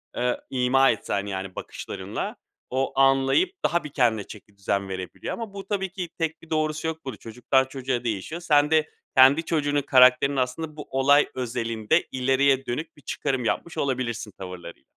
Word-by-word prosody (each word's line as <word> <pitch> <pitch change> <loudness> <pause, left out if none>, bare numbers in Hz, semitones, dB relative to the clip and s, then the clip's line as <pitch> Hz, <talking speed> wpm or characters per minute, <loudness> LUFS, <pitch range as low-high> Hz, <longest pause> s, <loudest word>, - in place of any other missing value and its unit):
eee, 125 0 0
ima 130 +1 +3
etsen, 100 -2 -2
yani, 95 -2 -5
bakışlarınla, - - -5 0.3
o 135 +1 -1
anlayıp 135 - +4
daha 170 - +1
bir 150 - -6
kendine 120 -6 +1
çekidüzen 100 -1 -4
verebiliyor. 95 -1 -5
Ama 225 -4 -6
bu 195 -1 -8
tabii 195 -2 -1
ki, 180 -2 -5
tek 160 -1 -2
bir 165 - -16
doğrusu 155 0 -1
yok 160 -1 -5
bur 130 -4 -5
Çocuktan 125 +5 0
çocuğa 130 -2 -3
değişiyor. 115 - -3
Sen 150 -3 +3
de 155 -1 +3 0.3
kendi 135 +5 +7
çocuğunun 145 -3 +1
karakterini 130 +1 +5
aslında 150 +5 -3
bu 150 - -8
olay 140 +2 +4
özelinde 115 +2 0
ileriye 135 +1 +2
dönük 150 +7 -4
bir - - -17
çıkarım 130 -1 -2
yapmış 170 +8 -2
olabilirsin 120 -5 -2
tavırlarıyla. 90 -2 -9
135 Hz, 160 wpm, -25 LUFS, 120-155 Hz, 0.3 s, kendi